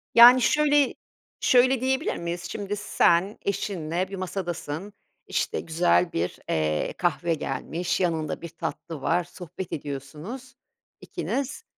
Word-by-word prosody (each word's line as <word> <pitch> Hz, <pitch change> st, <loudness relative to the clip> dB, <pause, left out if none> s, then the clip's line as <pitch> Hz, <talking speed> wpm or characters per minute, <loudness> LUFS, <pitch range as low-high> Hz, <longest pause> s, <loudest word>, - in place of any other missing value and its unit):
Yani, 245 Hz, +2 st, +10 dB
şöyle 290 Hz, +2 st, +3 dB, 0.5 s
şöyle 255 Hz, -1 st, +4 dB
diyebilir 265 Hz, +9 st, 0 dB
miyiz? 170 Hz, +1 st, -4 dB
Şimdi 205 Hz, -1 st, -3 dB
sen 195 Hz, -2 st, +2 dB
eşinle 185 Hz, -3 st, -2 dB
bir 195 Hz, -, -5 dB
masadasın, 185 Hz, -1 st, -4 dB, 0.3 s
işte -, -, -1 dB
güzel 170 Hz, +1 st, +2 dB
bir, 85 Hz, +2 st, -2 dB
eee, 75 Hz, -1 st, 0 dB
kahve 175 Hz, -1 st, +1 dB
gelmiş, 160 Hz, +4 st, -2 dB
yanında 165 Hz, -4 st, -1 dB
bir 170 Hz, -, -6 dB
tatlı 160 Hz, -1 st, -6 dB
var. 175 Hz, +5 st, +2 dB
Sohbet 180 Hz, +1 st, -8 dB
ediyorsunuz 150 Hz, -, -7 dB, 0.5 s
ikiniz 280 Hz, -, -3 dB
180 Hz, 115 wpm, -26 LUFS, 160-230 Hz, 0.5 s, Yani